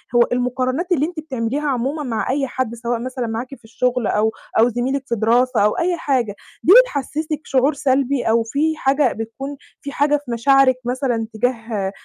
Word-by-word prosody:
هو 240 - +6
المقارنات 255 +7 -1
اللي 295 -1 +2
أنتِ 345 -1 -6
بتعمليها 275 -1 -3
عمومًا 275 +4 -1
مع 230 -3 -2
أي 275 +1 0
حد 250 -2 -3
سواء 235 0 -2
مثلًا 250 -1 -4
معاكِ 240 +5 -5
في - - -26
الشغل 250 0 -1
أو 220 +1 +1 0.3
أو 235 - +5
زميلِك 255 +4 -2
في 235 - 0
دراسة 240 +3 +2
أو 210 - +1
أي 350 0 0
حاجة، 250 -10 -1 0.3
دي 365 - +7
بتحسسِك 305 - -4
شعور 270 +3 +2
سلبي 270 -1 +1
أو 225 +1 +2
في 295 +7 0
حاجة 270 -1 +2
بتكون 250 +6 -6 0.2
في 280 - -6
حاجة 295 +1 +2
في 245 - -6
مشاعرِك 270 +2 +4
مثلًا 245 -3 -1
تجاه 225 -4 -2
255 Hz, 180 wpm, -20 LUFS, 235-280 Hz, 0.3 s, دي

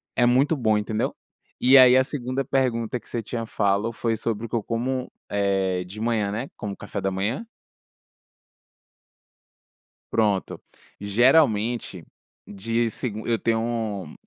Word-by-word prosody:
é - - +2
muito 135 +6 +3
bom 110 -6 +2
entendeu? 105 +1 -2 0.5
E 130 +2 +8
aí, 130 -1 +8
a 130 - +5
segunda 130 -1 -3
pergunta 125 -3 0
que - - -23
você 120 - -3
tinha 115 +1 -4
falo 105 0 0
foi 115 0 -1
sobre 115 0 -3
o - - -21
que - - -3
eu 115 - -1
como, 125 +3 -2 0.2
eh, 95 -2 0
de 100 +4 -9
manhã, 110 -3 0
né? 115 +6 -4
Como 105 -3 -5
café 100 - -6
da 95 0 -1
manhã? 105 - -2 2.7
Pronto, 105 -4 0 0.4
geralmente, 110 - +2 0.4
de 115 +3 -2
segun 110 -1 -4
eu 115 -1 +2
tenho 115 -6 -2
115 Hz, 140 wpm, -24 LUFS, 100-120 Hz, 2.7 s, E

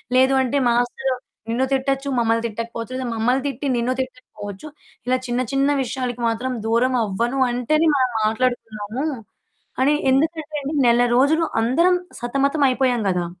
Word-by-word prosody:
లేదు 260 +1 +5
అంటే 260 +2 0
మాస్టరు 245 +2 0 0.4
నిన్ను 250 +3 +1
తిట్టొచ్చు, 270 +1 0
మమ్మల్ని 230 0 +1
తిట్టకపోవచ్చు. 230 +2 -6
లేదా 260 -1 -3
మమ్మల్ని 250 +4 +1
తిట్టి, 275 +1 -3
నిన్ను 245 +2 0
తిట్టకపోవచ్చు 255 -2 -7 0.4
ఇలా 255 +1 +3
చిన్న, 240 +1 0
చిన్న 275 +1 +2
విషయాలకి 245 -1 -4
మాత్రం 245 +3 -1
దూరం 250 +3 +2
అవ్వను 235 +6 -1
అంటేనే 305 +7 +2
మనం 255 -2 +2
మాట్లాడుకుందాము. 225 +1 -2 0.8
అని 285 +3 +4 0.2
ఎందుకంటేండి 305 0 -1
నెల 240 +1 +5
రోజులు 315 +5 +3 0.2
అందరం 335 +10 +3 0.2
సతమతం 275 +4 +1
అయిపోయాం 250 -3 +1
గదా! 180 -1 -1
255 Hz, 135 wpm, -21 LUFS, 235-275 Hz, 0.8 s, లేదు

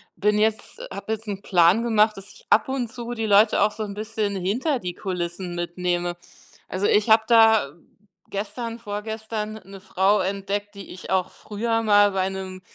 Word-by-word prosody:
bin 210 +1 +1
jetzt 220 0 -1
habe 200 +3 -6
jetzt 220 0 -7
'n 200 -1 -4
Plan 185 +3 +4
gemacht, 215 -2 +3
dass 195 +1 -11
ich - - -19
ab 215 - +4
und 265 -3 -1
zu 240 -1 -6
die 225 -2 -3
Leute 210 +1 +4
auch 215 - +3
so 215 +1 -5
'n 200 -1 -6
bisschen 215 -1 -3
hinter 240 - -1
die 180 -3 -5
Kulissen 180 -1 -4
mitnehme. 175 0 -2 0.5
Also, 185 +2 -2
ich 210 +2 +2
habe 220 0 +6
da 225 - +5 0.6
gestern 230 +3 -5
vorgestern 220 0 -5
'ne 195 +1 -12
Frau 195 +1 +2
entdeckt, 200 +2 -3
die 200 -1 -10
ich 185 - -10
auch 185 -1 +1
früher 225 +2 -2
mal 205 -1 +5
bei 190 -1 0
'nem 190 -1 -7
205 Hz, 180 wpm, -24 LUFS, 190-220 Hz, 0.6 s, habe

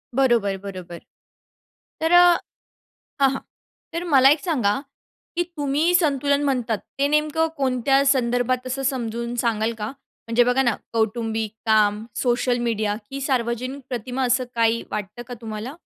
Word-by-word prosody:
बरोबर, 235 -7 +2
बरोबर. 185 -3 -7 1.0
तर 320 - +1
अ, 350 0 +7 0.8
हां, 270 - +6
हां. 270 - -3 0.5
तर 335 +1 -2
मला 265 0 +7
एक 295 +2 +4
सांगा 250 - 0 0.6
की 350 - +1
तुम्ही 295 +4 +1
संतुलन 285 -4 +2
म्हणतात 245 -6 0 0.2
ते 280 - +3
नेमकं 300 +2 +1
कोणत्या 270 0 +2
संदर्भात 255 -1 +1
असं 270 +2 -3
समजून 235 -3 -2
सांगाल 225 -1 0
का? 210 -1 -3 0.4
म्हणजे 230 +1 +4
बघा 245 +2 +2
ना 240 -5 +2 0.2
कौटुंबिक 225 -1 -1
काम, 215 -1 +3
सोशल 245 0 +1
मीडिया 215 -2 0
की 275 0 -5
सार्वजनिक 255 0 -1
प्रतिमा, 250 +1 -3
असं 255 +1 +2
काही 230 0 +2
वाटतं 210 +3 -5
का 250 - -6
तुम्हाला? 220 +4 -6
245 Hz, 140 wpm, -23 LUFS, 225-275 Hz, 1.0 s, अ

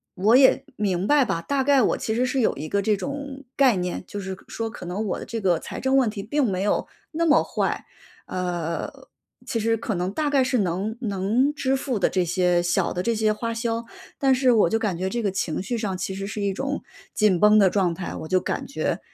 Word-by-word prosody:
我 210 +6 +4
也 270 0 +5
明 190 -3 -1
白 290 +3 +4
吧， 165 - -1
大 270 +9 -1
概 280 -1 +4
我 - - +2
其 220 - -2
实 250 - +2
是 260 +1 -1
有 230 - +1
一 155 - -5
个 200 +3 0
这 210 0 +1
种 280 +4 -6
概 265 -5 +4
念， 180 0 -3
就 205 - -6
是 190 -1 -5
可 185 - -12
说 225 0 -4
可 180 - -9
能 200 +5 -3
我 200 - -2
的 - - -7
这 230 - -4
个 180 -5 +2
财 - - -7
政 265 0 +1
问 255 -5 +4
题 200 -2 -6
并 285 +6 0
没 195 -4 0
有 205 - 0 0.2
那 335 +1 0
么 295 - +5
坏， - - -2 0.4
呃， 175 -2 -3 0.5
其 230 - -2
实 225 +1 +1
可 220 -1 -3
能 180 +1 -2
大 295 +5 -1
概 270 -2 +4
是 255 0 +1
能 200 +3 -1
能 220 +7 +1
支 270 -3 0
付 260 -5 -2
的 - - +2
这 185 -2 0
些 175 0 +2
小 175 - +1
的 180 - -2
这 235 - +1
些 215 -1 +2
花 230 +2 -3
销。 230 0 -2 0.3
但 270 -1 +3
是 255 -1 +3
我 215 -6 +4
就 225 +5 0
感 200 -6 -1
觉 185 +2 -2
这 235 +4 -2
个 205 - 0
情 185 -4 -2
绪 230 +5 -3
上 205 -4 -2
其 190 +1 -4
实 195 - -4
是 205 +1 -5
一 200 -1 +1
种 275 +7 -3 0.3
紧 205 -5 +3
绷 210 +2 +6
的 195 - +6
状 180 -3 +1
态， 175 +1 -6
我 160 - -6
就 185 +1 +2
感 - - -3
觉， - - -2
215 Hz, 265 characters per minute, -24 LUFS, 185-255 Hz, 0.5 s, 绷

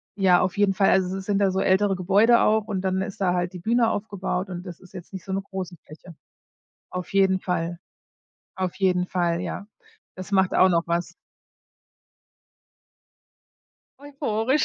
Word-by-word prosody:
ja, 185 -3 +4
auf 185 +1 -1
jeden 200 -1 +3
Fall. 195 0 +3
Also 190 0 +1
es 190 - -7
sind 200 0 0
da 195 -1 +3
so 190 - -1
ältere 195 +1 +2
Gebäude 200 +6 +4
auch 215 0 +2
und 195 -3 -2
dann 190 0 0
ist 190 - -6
da 180 -2 +1
halt 180 0 -1
die 180 - -8
Bühne 230 +4 +2
aufgebaut 195 -2 -3
und 175 0 -6
das 175 -3 -9
ist 185 0 -18
jetzt 180 -2 -10
nicht 190 -3 -8
so 190 - -4
'ne 195 - -1
große 190 -3 -6
Fläche. 165 +2 -13 0.8
Auf 180 -1 -5
jeden 190 -1 +3
Fall 175 -2 -3 0.8
auf 185 -2 -3
jeden 180 -2 +1
Fall, 170 -2 0
ja. 180 +3 -5 0.5
Das 185 +2 -9
macht 190 -1 +3
auch 185 - +6
noch 170 -1 +2
was. 170 +1 -2 2.9
Euphorisch. 275 -2 0
190 Hz, 170 wpm, -24 LUFS, 180-200 Hz, 2.9 s, auch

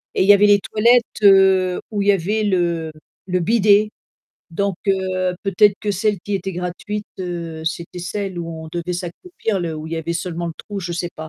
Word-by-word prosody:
et - - +3
il - - 0
y 205 - +9
avait 205 +1 +5
les 205 0 +6
toilettes, 235 +4 +3 0.2
heu, 190 -2 +5
où 205 -2 -1
il 200 - -1
y - - +9
avait 200 +3 0
le 170 -5 0 0.4
le 180 -1 0
bidet, 210 +2 +4 0.6
donc 195 +2 -1
heu, 185 -1 0
peut-être 200 +1 +4
que 210 - -1
celles 205 +1 0
qui 205 +2 -4
était 195 0 -3
gratuites, 180 +4 -5
heu, 170 -3 -5
c'était 170 +1 -4
celles 190 +1 -4
où 165 -1 -6
on - - -9
devait 175 +2 -3
s'accroupir 195 - -4
là 165 -2 -3
où 155 - -7
il 160 - -7
y - - -3
avait 165 +1 -3
seulement 170 0 -3
le 165 - -4
trou, 205 -1 -7
je 175 -1 -4
sais 175 0 -3
pas. 160 0 -8
185 Hz, 215 wpm, -20 LUFS, 170-205 Hz, 0.6 s, y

